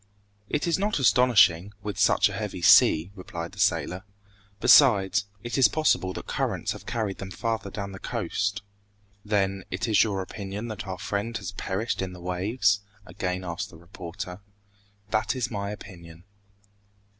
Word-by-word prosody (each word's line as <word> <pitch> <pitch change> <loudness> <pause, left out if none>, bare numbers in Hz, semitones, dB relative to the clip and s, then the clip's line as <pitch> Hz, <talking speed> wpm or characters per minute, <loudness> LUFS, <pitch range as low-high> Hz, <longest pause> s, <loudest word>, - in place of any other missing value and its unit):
"It 150 - 0
is 170 +1 +1
not 205 +2 0
astonishing, 110 - +4
with 105 -2 -4
such 100 - +4
a 100 - -6
heavy 95 -3 -5
sea," 80 +3 +6
replied 85 -3 -7
the - - -13
sailor. 90 +3 +1 0.6
"Besides, 105 -4 +5 0.2
it 120 +3 -2
is 130 - +7
possible 155 -11 +1
that - - -7
currents - - -2
have - - -8
carried 110 -4 -2
them 95 - -6
farther 110 +1 -3
down 100 0 -5
the 95 - -9
coast." 100 +1 -2 0.6
"Then, 100 -2 0
it 95 +5 -2
is 110 -2 +5
your 100 -3 -2
opinion 100 +4 -6
that 105 -2 -6
our 95 -1 -4
friend 105 +4 -3
has 100 -3 -6
perished 100 +3 -3
in 95 -1 -4
the 90 - -10
waves?" 100 +4 +1 0.3
again 90 -2 -3
asked 90 +4 -4
the 85 - -14
reporter. 90 +2 -8 0.7
"That 110 +4 +1
is 125 -1 -2
my 100 -2 -3
opinion." 85 -5 -10
100 Hz, 160 wpm, -26 LUFS, 95-110 Hz, 0.7 s, is